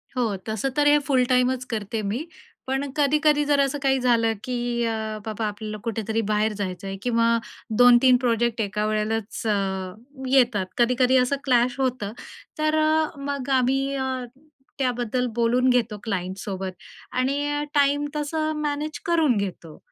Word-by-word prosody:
हो, 230 -5 0
तसं 220 +4 -1
तर 290 0 +4
हे 295 - +6
फुल 260 -3 +3
टाईमच 250 0 +2
करते 215 +1 -3
मी. 220 +10 -2 0.4
पण 270 +2 -1
कधी-कधी 295 +1 +3
जर 290 -1 +2
असं 275 +1 +1
काही 270 -1 +3
झालं, 230 -2 +2
की 240 -2 -2
अ, 225 - 0 0.3
बाबा 220 0 -3
आपल्याला 215 +1 -5
कुठेतरी 225 -1 -2
बाहेर 215 +1 +1
जायचं 195 -2 -5
आहे 195 - -5
किंवा 230 -1 +2 0.4
2-3 245 +1 +7
प्रोजेक्ट 235 -1 +1
एका 210 +1 -1
वेळेलाच 215 0 -2
अ, - - +3 0.8
येतात. 245 -7 +3
कधी-कधी 250 +2 +3
असं 250 +2 +2
क्लॅश 250 0 +2
होतं. 250 -6 -1 0.5
तर 310 0 +2
अ, 310 0 +2
मग 280 -1 -4
आम्ही 270 +2 +1
अ, 260 -1 -2 0.6
त्याबद्दल 250 -1 0
बोलून 240 +2 +2
घेतो 235 -4 +1
क्लाइंटसोबत 190 -1 -4 0.5
आणि 290 +3 0
टाईम 285 0 +3
तसं 310 +1 -1
मॅनेज 300 +1 -3
करून 320 -9 +3
घेतो. 175 -5 -5
250 Hz, 145 wpm, -24 LUFS, 220-275 Hz, 0.8 s, 2-3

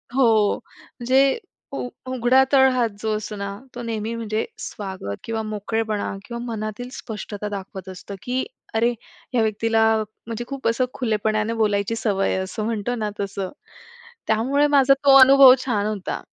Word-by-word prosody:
हो. 260 -4 +5 0.7
म्हणजे 265 - +3 0.7
उघडा 255 +1 +4
तळहात 255 -3 +4
जो 220 -1 0
असतो 210 0 -6
ना, 200 -1 -4 0.2
तो 245 - -5
नेहमी 225 -1 -3
म्हणजे 220 -1 -2
स्वागत 190 - -6
किंवा 225 -1 -3
मोकळेपणा 215 0 -2
किंवा 235 -1 -6
मनातील 220 +1 -5
स्पष्टता 210 -1 -6
दाखवत 190 -1 -7
असतो, 190 +2 -8
की 255 +1 -1 0.3
अरे 235 +2 +3 0.4
ह्या 240 - +3
व्यक्तीला 225 +1 +2 0.4
म्हणजे 230 +1 -4
खूप 275 0 -4
असं 230 +3 +1
खुलेपणाने 215 -1 0
बोलायची 210 -1 0
सवय 200 -4 0
आहे - - -1
असं 210 +3 -4
म्हणतो 230 +1 -2
ना 215 -3 -2
तसं. 195 -1 -3 0.8
त्यामुळे 265 +7 +2
माझा 275 0 +6
तो 275 -1 +8
अनुभव 270 0 +9
छान 210 -5 0
होता. 210 -3 -4
225 Hz, 145 wpm, -23 LUFS, 210-245 Hz, 0.8 s, अनुभव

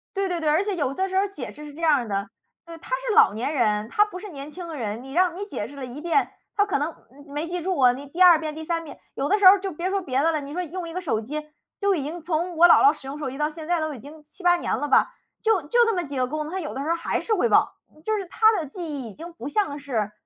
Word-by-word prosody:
对 390 0 0
对 355 -2 -2
对， 310 -2 0
而 315 +6 +3
且 405 -1 -2
有 280 -6 -1
的 380 +5 -1
时 380 - -1
候 395 +1 +3
解 295 -11 -7
释 300 +1 -11
是 295 - -10
这 330 - -10
样 315 -3 +5
儿 245 -4 -2
的， 200 0 -2 0.4
对， 335 -1 -10
他 330 - -15 0.2
是 435 - +1
老 450 -1 +7
年 240 +8 -2
人， 215 -5 +1
他 420 - +4
不 410 -4 -8
是 415 +2 -8
年 285 -3 -8
轻 350 +2 -8
的 320 -2 -6
人， 225 -1 -4
你 270 0 -10
让 355 +1 +2
你 405 - -4
解 410 - -5
释 285 - -13
了 275 -2 -6
一 250 +4 -8
遍， 345 +5 +1 0.2
他 410 - +3
可 410 - 0
能， 300 +3 -1 0.2
嗯， 285 +2 -16
没 295 +3 -4
记 350 0 -3
住 370 0 -1
啊。 255 -2 +6
你 275 +3 -9
第 335 +6 -5
2 350 -3 +8
遍 310 -1 -4
第 315 - -6
三 330 +1 -2
遍， 310 - -11 0.2
有 275 - -1
的 415 - +4
时 405 - +1
候 370 - +11
儿 405 - +1
就 390 - -3
别 340 +3 -3
说 395 0 0
别 270 -6 0
的 325 +3 +3
了， 310 -2 -1
你 280 +1 -8
说 360 +2 -2
用 345 +1 -6
一 - - -8
个 365 - -3
手 265 -11 -1
机 300 +6 -6 0.3
就 400 -1 +2
已 300 - -2
经， 325 +5 -5
从 345 +1 -1
我 345 +2 +8
姥 350 - +6
姥 415 - +7
使 265 - -12
用 280 +2 -6
手 285 -3 -3
机 270 - -8
到 300 0 0
现 315 0 -9
在 350 -1 +1
都 315 -1 -2
已 255 - -9
经 300 +4 -13
7-8 350 +3 +1
年 - - -1
了 295 - -2
吧， 395 - +4 0.3
就 440 -4 +2
就 475 +11 +3
这 455 - +1
么 355 - -1
几 285 -3 -6
个 255 -1 +1
功 305 +3 -3
能， 305 - -7
她 380 - -3
有 305 -5 -5
的 270 - -4
时 290 - -4
候 335 - +2
儿 - - 0
还 335 - -2
是 450 - -1
会 405 - +2
忘， - - +4 0.3
嗯， 305 - -20
就 435 +3 0
是 395 - -4
她 440 +5 +4
的 330 - -2
记 350 +6 -8
忆 285 -6 -5
已 - - -11
经 335 - -10
不 275 -6 -8
像 295 -2 -1
是， 235 -8 -2
315 Hz, 350 characters per minute, -24 LUFS, 280-365 Hz, 0.4 s, 候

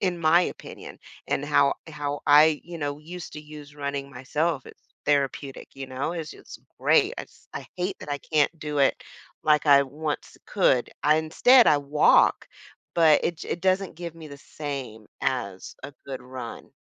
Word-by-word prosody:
in 180 -3 0
my 170 +2 +4
opinion, - - -7 0.3
and - - 0
how - - +3 0.2
how 145 0 -4
I, 150 +1 +6
you 175 0 -8
know, 145 -1 -3
used 170 +2 -9
to 150 - -7
use 150 -1 -12
running 140 -1 -4
myself, 140 +3 -2
it's - - -15 0.2
therapeutic, 140 -1 -1
you 135 -1 -7
know? 130 +6 -3
It's 160 -3 -5
just - - -12 0.2
great. 430 +1 +3
I - - -4
just - - -25
I - - -6
hate 185 +2 -3
that 145 - -8
I 145 - -1
can't 155 +2 +1
do 150 -1 -4
it 140 - +2 0.4
like 150 -1 +3
I 140 -1 +7
once 150 +2 -5
could. 135 -11 +2
I 150 +1 +4
instead, 230 +11 +5
I 145 - +5
walk, 145 +1 +3 0.5
but 160 -3 +5
it 170 - -1
j - - -8
it 170 - -2
doesn't 190 -1 +1
give 170 -1 -7
me 160 -2 -11
the 140 - -10
same 135 -8 -7 0.2
as 100 -8 -3
a 145 - -7
good 135 -2 -6
run. 125 -2 -8
150 Hz, 180 wpm, -25 LUFS, 140-165 Hz, 0.5 s, I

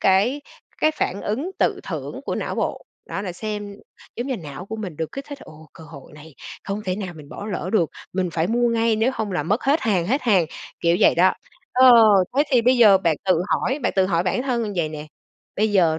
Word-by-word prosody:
cái 210 +10 +3 0.4
cái 310 - +3
phản 200 -10 -3
ứng 270 - -2
tự - - +1
thưởng - - -6
của - - -1
não - - -3
bộ, - - -2 0.3
đó 195 - -4
là 185 -3 -4
xem 205 +1 -5 0.4
giống 240 +3 -3
như, 265 - -2
não 165 0 -9
của 220 +2 -6
mình 185 -8 -6
được 160 0 -4
kích 275 - -6
thích 285 - -7
"Ồ, 155 0 -14
cơ 160 - -13
hội 145 -4 -13
này 150 0 -14 0.3
không 200 +2 -4
thể 185 -1 -2
nào 190 -4 -6
mình 145 -2 -12
bỏ 205 - -8
lỡ 185 -3 -4
được, 175 -8 +2 0.2
mình 185 -1 -1
phải 165 0 0
mua 240 +3 +1
ngay, 230 -1 +1
nếu 225 +4 +2
hông 210 -5 -3
là 150 - -1
mất 205 - -1
hết 290 +4 +2
hàng, 190 -8 0
hết 270 +7 0
hàng." 195 -9 +3 0.3
kiểu 170 0 +3
vậy - - +5
đó. 185 +2 +4 0.4
Ờ, 255 0 +7 0.4
thế 285 - +5
thì 245 -4 +4
bây 250 +2 +4
giờ 210 -5 +7
bạn 165 -5 +1
tự 180 -3 +2
hỏi 265 - 0
bạn - - 0
tự 190 -1 +4
hỏi 170 -3 +1
bản 185 +7 -1
thân 245 -3 -1
như 210 - -3
vậy 165 -3 0
nè, 155 0 -8 0.5
bây 215 +1 +1
giờ 165 -5 +3
200 Hz, 240 wpm, -22 LUFS, 170-235 Hz, 0.5 s, Ờ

